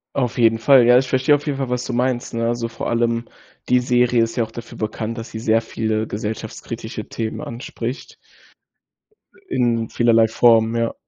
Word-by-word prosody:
Auf 125 Hz, -3 st, -1 dB
jeden 115 Hz, -1 st, +3 dB
Fall, 130 Hz, -1 st, +6 dB
ja. 125 Hz, +1 st, +6 dB
Ich 130 Hz, -, -2 dB
verstehe 130 Hz, +3 st, +3 dB
auf 145 Hz, -, -5 dB
jeden 140 Hz, -2 st, -1 dB
Fall, 135 Hz, -2 st, -3 dB
was 125 Hz, 0 st, -2 dB
du 125 Hz, -, -4 dB
meinst, 125 Hz, 0 st, -1 dB
ne, 115 Hz, 0 st, 0 dB
also 120 Hz, 0 st, -1 dB
vor 115 Hz, 0 st, -6 dB
allem 115 Hz, 0 st, 0 dB, 0.4 s
die 125 Hz, -, +5 dB
Serie 125 Hz, -1 st, +2 dB
ist 115 Hz, -, -3 dB
ja 120 Hz, -, +1 dB
auch 110 Hz, -, -8 dB
dafür 115 Hz, +1 st, -10 dB
bekannt, 110 Hz, +1 st, -4 dB
dass 115 Hz, -, -7 dB
sie 110 Hz, -, -6 dB
sehr 110 Hz, 0 st, +2 dB
viele 110 Hz, -1 st, -2 dB
gesellschaftskritische 105 Hz, +1 st, -6 dB
Themen 110 Hz, -1 st, -4 dB
anspricht. 120 Hz, +2 st, -6 dB, 1.3 s
äh, -, -, -7 dB
in 115 Hz, -2 st, +1 dB
vielerlei 115 Hz, -1 st, +3 dB
Form, 115 Hz, 0 st, +3 dB
ja. 115 Hz, 0 st, 0 dB
115 Hz, 190 wpm, -20 LUFS, 115-125 Hz, 1.3 s, Fall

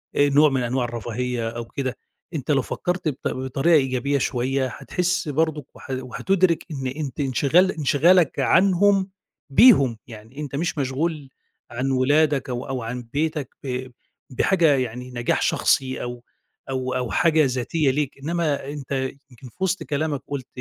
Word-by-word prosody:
آآ 145 Hz, 0 st, +4 dB
نوع 145 Hz, +2 st, +5 dB
من 130 Hz, -2 st, 0 dB
أنواع 125 Hz, +1 st, 0 dB
الرفاهية 120 Hz, 0 st, -3 dB
أو 120 Hz, 0 st, -6 dB
كده، 130 Hz, +1 st, -4 dB, 0.4 s
أنت 150 Hz, -2 st, -2 dB
لو 140 Hz, -, +3 dB
فكَّرت 180 Hz, -1 st, -3 dB
بط 145 Hz, -4 st, -2 dB
بطريقة 130 Hz, +5 st, 0 dB
إيجابية 135 Hz, 0 st, +1 dB
شويّة، 130 Hz, +1 st, 0 dB
هتحس 180 Hz, +6 st, -2 dB
برضه، 155 Hz, -1 st, 0 dB
وه -, -, -14 dB, 0.2 s
وهتُدرِك 175 Hz, +6 st, +1 dB
إن 135 Hz, -3 st, -4 dB
أنت 140 Hz, 0 st, -5 dB
انشغال 145 Hz, +7 st, +3 dB
انشغالك 160 Hz, +2 st, +3 dB
عنهم 195 Hz, +1 st, +3 dB, 0.4 s
بيهم 140 Hz, -, +6 dB
يعني، 115 Hz, +3 st, -12 dB
أنت 145 Hz, -2 st, -5 dB
مش 165 Hz, +3 st, -2 dB
مشغول 145 Hz, +2 st, -2 dB, 0.4 s
عن 130 Hz, +3 st, -2 dB
ولادك 145 Hz, +1 st, +2 dB
أو 125 Hz, +2 st, -4 dB
أو 130 Hz, -3 st, -3 dB
عن 120 Hz, +2 st, -5 dB
بيتك، 150 Hz, -2 st, -1 dB
ب 130 Hz, -1 st, -3 dB, 0.4 s
بحاجة 165 Hz, +1 st, +3 dB
يعني 125 Hz, 0 st, -4 dB
نجاح 120 Hz, -1 st, -1 dB
شخصي، 130 Hz, -1 st, +1 dB
أو 120 Hz, 0 st, -6 dB, 0.5 s
أو 130 Hz, -1 st, -2 dB
أو 125 Hz, -2 st, -2 dB
حاجة 160 Hz, -3 st, +3 dB
ذاتية 135 Hz, +3 st, 0 dB
ليك، 140 Hz, 0 st, -2 dB
إنّما 155 Hz, -3 st, -1 dB
أنت 145 Hz, -2 st, -8 dB, 0.4 s
يمكن 125 Hz, +1 st, -13 dB
في -, -, -29 dB
وسط 190 Hz, 0 st, 0 dB
كلامك 150 Hz, -1 st, -2 dB
قُلت، 140 Hz, -3 st, -5 dB
140 Hz, 150 wpm, -23 LUFS, 125-155 Hz, 0.5 s, بيهم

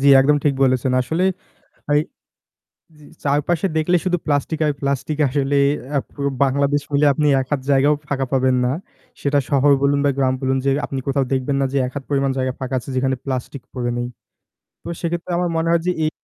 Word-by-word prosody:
জ্বী 140 Hz, -, +4 dB
একদম 145 Hz, +2 st, +4 dB
ঠিক 140 Hz, -2 st, +3 dB
বলেছেন। 130 Hz, -1 st, +2 dB
আসলে 165 Hz, +8 st, -1 dB, 0.7 s
এই 150 Hz, -, +5 dB, 1.0 s
জি, 150 Hz, -, -17 dB, 0.2 s
চারপাশে 150 Hz, +5 st, +1 dB
দেখলে 175 Hz, +3 st, +2 dB
শুধু 180 Hz, -1 st, +1 dB
প্লাস্টিক 145 Hz, +2 st, 0 dB
আর 150 Hz, -, +2 dB
প্লাস্টিক 140 Hz, +2 st, -1 dB
আসলে। 140 Hz, +1 st, 0 dB, 0.4 s
আ -, -, +4 dB
পুরো 140 Hz, -1 st, -2 dB, 0.2 s
বাংলাদেশ 140 Hz, +2 st, +1 dB
মিলে 145 Hz, +1 st, +3 dB
আপনি 150 Hz, +2 st, 0 dB
১ 130 Hz, -, -3 dB
হাত 140 Hz, -, +1 dB
জায়গাও 140 Hz, +2 st, +4 dB
ফাঁকা 135 Hz, -2 st, -1 dB
পাবেন 130 Hz, -1 st, +3 dB
না। 125 Hz, -, +1 dB, 0.5 s
সেটা 145 Hz, 0 st, +1 dB
শহর 140 Hz, 0 st, +4 dB
বলুন 140 Hz, 0 st, +3 dB
বা 140 Hz, -, +4 dB
গ্রাম 130 Hz, -1 st, +2 dB
বলুন 130 Hz, 0 st, 0 dB
যে 140 Hz, -, +3 dB, 0.2 s
আপনি 135 Hz, -, -4 dB
কোথাও 135 Hz, 0 st, +1 dB
দেখবেন 135 Hz, +1 st, 0 dB
না -, -, +2 dB
যে 140 Hz, -, -1 dB
১ 125 Hz, -, -7 dB
হাত 135 Hz, -, -4 dB
পরিমাণ 135 Hz, -1 st, +1 dB
জায়গা 130 Hz, 0 st, 0 dB
ফাঁকা 130 Hz, -1 st, -4 dB
আছে 125 Hz, -, -10 dB
যেখানে 130 Hz, 0 st, +1 dB
প্লাস্টিক 130 Hz, 0 st, -4 dB
পড়ে 120 Hz, -1 st, -2 dB
নেই। 120 Hz, -, -2 dB, 0.7 s
তো -, -, -8 dB
সেক্ষেত্রে 170 Hz, +1 st, -3 dB
আমার 180 Hz, -1 st, 0 dB
মনে 165 Hz, +1 st, 0 dB
হয় 170 Hz, -1 st, +3 dB
যে 180 Hz, -, +3 dB
এই 155 Hz, -, +1 dB
140 Hz, 200 wpm, -20 LUFS, 130-150 Hz, 1.0 s, এই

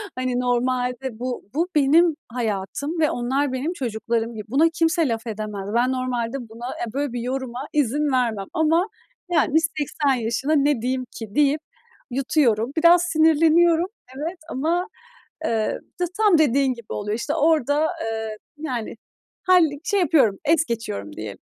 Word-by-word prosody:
Hani 255 Hz, -1 st, -1 dB
normalde 250 Hz, 0 st, -1 dB
bu 250 Hz, -3 st, -4 dB
bu 335 Hz, +4 st, +1 dB
benim 305 Hz, +3 st, +5 dB, 0.2 s
hayatım 240 Hz, -, -3 dB
ve 305 Hz, -, +3 dB
onlar 260 Hz, +3 st, -1 dB
benim 290 Hz, +7 st, -2 dB
çocuklarım 230 Hz, -, -2 dB
gibi. 215 Hz, -1 st, -6 dB
Buna 305 Hz, +6 st, +4 dB
kimse 330 Hz, -1 st, +1 dB
laf 230 Hz, 0 st, -3 dB
edemez. 210 Hz, -2 st, -5 dB
Ben 245 Hz, +2 st, +3 dB
normalde 250 Hz, -1 st, -3 dB
buna, 235 Hz, +2 st, -8 dB
eee, 230 Hz, -2 st, -4 dB
böyle 280 Hz, -2 st, -2 dB
bir 240 Hz, -, -3 dB
yoruma 260 Hz, +1 st, -4 dB
izin 290 Hz, +1 st, +1 dB
vermem 230 Hz, -6 st, 0 dB
ama 325 Hz, +5 st, +2 dB, 0.4 s
yani, 315 Hz, -2 st, +3 dB, 0.2 s
"80 290 Hz, -1 st, 0 dB
yaşına 265 Hz, +7 st, 0 dB
ne 285 Hz, -4 st, +2 dB
diyeyim 255 Hz, +1 st, -1 dB
ki?" 220 Hz, -1 st, -9 dB
deyip 295 Hz, +1 st, +3 dB, 0.5 s
yutuyorum. 255 Hz, -3 st, +1 dB
Biraz 340 Hz, +2 st, +6 dB
sinirleniyorum, 325 Hz, +1 st, +4 dB, 0.3 s
evet, 330 Hz, +5 st, -4 dB
ama 340 Hz, +8 st, 0 dB, 0.6 s
eee, 220 Hz, -2 st, 0 dB, 0.2 s
t 355 Hz, -, +2 dB
tam 420 Hz, -6 st, +5 dB
dediğin 275 Hz, -3 st, +3 dB
gibi 235 Hz, -3 st, -9 dB
oluyor. 210 Hz, +2 st, -2 dB
İşte -, -, -2 dB
orada, 305 Hz, 0 st, +2 dB, 0.2 s
eee, 220 Hz, -1 st, -4 dB, 0.2 s
yani 255 Hz, -7 st, -4 dB, 0.5 s
halli 330 Hz, -6 st, +4 dB
şey 405 Hz, -, +1 dB
yapıyorum, 270 Hz, -, +3 dB
es 320 Hz, +1 st, +3 dB
geçiyorum 100 Hz, -, -4 dB
diyelim. 105 Hz, -2 st, -6 dB
260 Hz, 150 wpm, -23 LUFS, 235-315 Hz, 0.6 s, Biraz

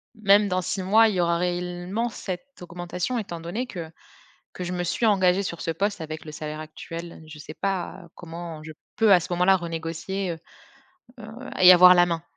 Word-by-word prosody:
même 205 Hz, -1 st, +4 dB
dans 185 Hz, 0 st, 0 dB
6 190 Hz, +3 st, -2 dB
mois 220 Hz, +4 st, +5 dB
il 210 Hz, -, -1 dB
y 180 Hz, -, +1 dB
aura 170 Hz, 0 st, +1 dB
réellement 180 Hz, +5 st, -2 dB
cette 205 Hz, +5 st, -7 dB
augmentation 180 Hz, +6 st, -4 dB
étant 175 Hz, -6 st, -6 dB
donné 195 Hz, +10 st, -4 dB
que 170 Hz, -7 st, -7 dB, 0.6 s
que 180 Hz, -, -7 dB
je 180 Hz, -, -4 dB
me 175 Hz, 0 st, -2 dB
suis 225 Hz, +6 st, 0 dB
engagée 190 Hz, -2 st, +3 dB
sur 170 Hz, -3 st, -5 dB
ce -, -, -2 dB
poste 200 Hz, +3 st, -2 dB
avec 155 Hz, 0 st, -6 dB
le 155 Hz, -, -9 dB
salaire 155 Hz, 0 st, -6 dB
actuel, 165 Hz, +2 st, -8 dB
je 155 Hz, -1 st, -11 dB
sais 155 Hz, -, -9 dB
pas 190 Hz, -2 st, -3 dB
comment 165 Hz, -2 st, -8 dB
je 155 Hz, 0 st, -9 dB, 0.2 s
peux 220 Hz, -3 st, +5 dB
à 180 Hz, -, +8 dB
ce 175 Hz, -, -7 dB
moment-là 180 Hz, +2 st, +4 dB
renégocier, 170 Hz, +3 st, -4 dB
heu 165 Hz, -, -8 dB, 0.8 s
heu 215 Hz, -, -9 dB, 0.3 s
et 185 Hz, -, +9 dB
avoir 180 Hz, 0 st, +8 dB
la 175 Hz, 0 st, +5 dB
main? 165 Hz, -1 st, -2 dB
180 Hz, 200 wpm, -25 LUFS, 165-195 Hz, 0.8 s, et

